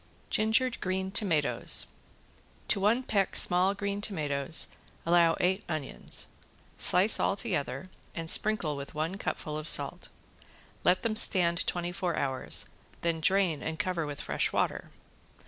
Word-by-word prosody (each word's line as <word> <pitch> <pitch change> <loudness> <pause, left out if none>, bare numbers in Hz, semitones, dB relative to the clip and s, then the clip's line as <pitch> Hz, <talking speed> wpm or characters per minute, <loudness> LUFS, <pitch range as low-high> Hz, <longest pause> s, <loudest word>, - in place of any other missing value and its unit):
~GINGERED 230 +3 +1
GREEN 190 +1 -2
TOMATOES~ 165 -8 +2 0.8
To 205 - +1
one 220 +6 +2
peck 200 -6 -1
small 185 +3 +4
green 200 0 -4
tomatoes 150 -6 -1 0.4
allow 170 -1 +3
eight 190 +3 0
onions. 155 -4 -2 0.5
Slice 190 +5 +5
all - - +1
together 140 -7 -3 0.3
and 165 -1 -5
sprinkle 180 -5 +3
with 140 +1 -9
one 160 +5 -3
cupful 150 0 -4
of 155 - -1
salt. - - 0 0.7
Let 180 +1 +2
them 225 -2 -1
stand 170 -5 +4
twenty 175 0 -2
four 175 -1 -3
hours, 130 -1 0 0.3
then 165 -1 -1
drain 185 -4 +1
and 160 0 -5
cover 180 -6 -2
with 145 -1 -7
fresh - - -1
water. - - -2
180 Hz, 135 wpm, -29 LUFS, 155-200 Hz, 0.8 s, Slice